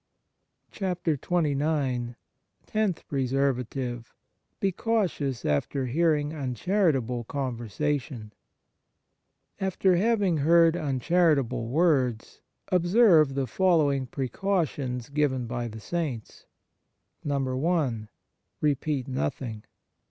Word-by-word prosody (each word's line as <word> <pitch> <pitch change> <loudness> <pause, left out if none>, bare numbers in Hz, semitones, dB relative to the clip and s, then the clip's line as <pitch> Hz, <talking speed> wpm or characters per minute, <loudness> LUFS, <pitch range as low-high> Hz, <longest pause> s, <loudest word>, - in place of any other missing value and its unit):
68 175 -7 -2
XXIX 145 -7 0 0.5
TENTH 215 -6 -1
PRESERVATIVE 130 -3 -1 0.5
Be 195 - +1
cautious 180 - -1
after 75 - 0
hearing 150 +2 +1
uncharitable 135 - 0
con 130 -1 -3
versation 120 0 -3 1.3
AFTER 190 -1 +2
having 205 -4 +2
heard 165 +3 +5
uncharitable 150 -4 +1
words, 130 -5 +1 0.3
observe 175 - +4
the 135 -1 0
following 145 -6 +2
precautions 135 -4 -2
given 140 -4 0
by 120 0 -3
the 110 -1 -8
Saints: 140 -4 -5 0.7
1. 135 -4 -1 0.5
Repeat 145 -2 0
nothing. 115 - -3
140 Hz, 80 wpm, -27 LUFS, 125-170 Hz, 1.3 s, heard